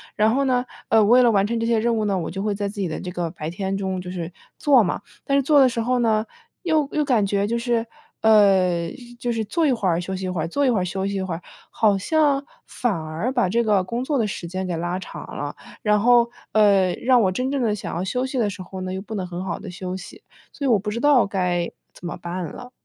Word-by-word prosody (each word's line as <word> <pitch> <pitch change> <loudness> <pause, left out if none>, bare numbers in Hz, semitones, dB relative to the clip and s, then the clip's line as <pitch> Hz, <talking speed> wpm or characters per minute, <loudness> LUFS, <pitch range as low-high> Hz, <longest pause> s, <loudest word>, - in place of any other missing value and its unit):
然 215 +1 +3
后 275 +2 +2
呢， 250 -1 +1 0.2
呃， 220 -1 +5
为 245 +4 +6
了 240 - +5
完 200 -3 +3
成 230 +2 -1
这 230 - -1
些 230 -1 +3
任 230 +1 +1
务 215 - 0
呢， 200 -2 +1
我 165 - -3
就 195 - -4
会 205 0 -1
在 200 0 -2
自 200 0 -5
己 185 - 0
的 160 - -4
这 180 - -6
个 175 -2 -2
白 155 -1 -6
天 195 +1 -2
中 190 -2 -2
就 180 - -8
是 175 -2 -5 0.2
做 275 -5 +5
嘛。 180 - -1 0.2
但 275 - +1
是 280 - +2
做 290 +2 +5
的 265 -2 +6
时 235 - -3
候 250 +2 +1
呢， 220 -2 +2 0.4
又 310 -4 +1
又 300 -1 +1
感 245 -7 +3
觉 200 0 +1
就 235 +2 -1
是 235 -1 0 0.4
呃， 190 -6 +4 0.3
就 240 0 -1
是 225 -2 -1
做 320 +10 0
一 - - +3
会 225 -6 0
儿 170 -1 +2
休 190 +2 -4
息 190 0 -4
一 - - -2
会 180 -3 -2
儿， 160 - -2
做 285 +12 0
一 - - +4
会 230 -5 +2
儿 - - -1
休 190 +2 -2
息 200 - -3
一 195 - -1
会 185 -2 -3
儿， 165 - -5 0.3
好 210 -3 +2
像 285 +5 +2 0.2
反 245 -3 -1
而 160 +8 -3
把 245 -7 +2
这 235 +6 +1
个 205 -3 +3
工 235 +6 -3
作 280 +1 0
的 220 -3 +1
时 180 - -5
间 185 +2 -4
给 175 - -2
拉 175 +2 -2
长 - - -8
了。 - - -4 0.3
然 210 -3 +3
后， 240 +1 +5 0.2
呃， 200 -4 +4
让 250 -1 +3
我 190 -3 +2
真 255 +7 -1
正 275 -1 -1
地 215 - +1
想 200 - -6
要 175 - -2
休 250 +7 -1
息 265 0 -4
的 220 -4 +2
时 200 -1 -7
候 185 0 -8
呢， 185 0 -4
又 190 - -4
不 220 +2 -7
能 190 -3 -2
很 180 +1 -6
好 175 - -3
地 - - -8
休 180 0 -5
息， 180 -2 -10 0.3
所 285 - -5
以 - - +2
我 225 - +5
不 210 +2 -4
知 230 - -3
道 280 -2 +5
该 180 -3 -1 0.2
怎 - - -12
么 175 - -4
办 175 +1 -5
了。 245 - -10
205 Hz, 300 characters per minute, -23 LUFS, 185-240 Hz, 0.4 s, 为